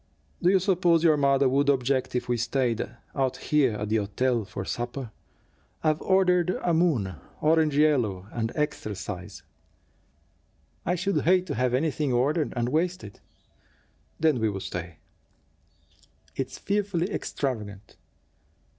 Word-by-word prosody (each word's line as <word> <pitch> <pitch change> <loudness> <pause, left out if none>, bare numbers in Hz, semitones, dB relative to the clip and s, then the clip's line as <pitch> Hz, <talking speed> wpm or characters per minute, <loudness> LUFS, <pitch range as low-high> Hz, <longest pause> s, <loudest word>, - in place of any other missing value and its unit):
Do 180 - +4
you 195 - +5
suppose 180 -3 +2
your 160 -2 +5
mother 140 -1 +3
would 140 +2 +2
object 130 -1 +1
if 125 - -1
we 120 - +1
stayed, 120 -1 0 0.2
out 135 -2 0
here 145 -6 +2
at 105 0 -4
the 110 - +2
hotel 115 +3 0
for 95 -1 -6
supper? 120 +1 -4 0.7
I've 155 -1 +1
ordered 180 -2 +3
a 175 - +2
moon, 130 - +1 0.2
orange 155 -2 +3
yellow 120 -12 +2
and 115 -1 -2
extra 150 -8 -2
size." 95 0 -7 1.4
"I 180 - +2
should 195 +3 0
hate 185 +1 +3
to 155 - -3
have 125 -1 +1
anything 150 0 0
ordered 145 +6 +1
and 120 0 0
wasted." 160 - -2 1.0
"Then 155 -5 +3
we'll 105 -3 0
stay." 90 -4 -6 1.4
"It's 135 -1 -4
fearfully 200 -2 -1
extravagant." 105 - -4
135 Hz, 130 wpm, -26 LUFS, 115-160 Hz, 1.4 s, you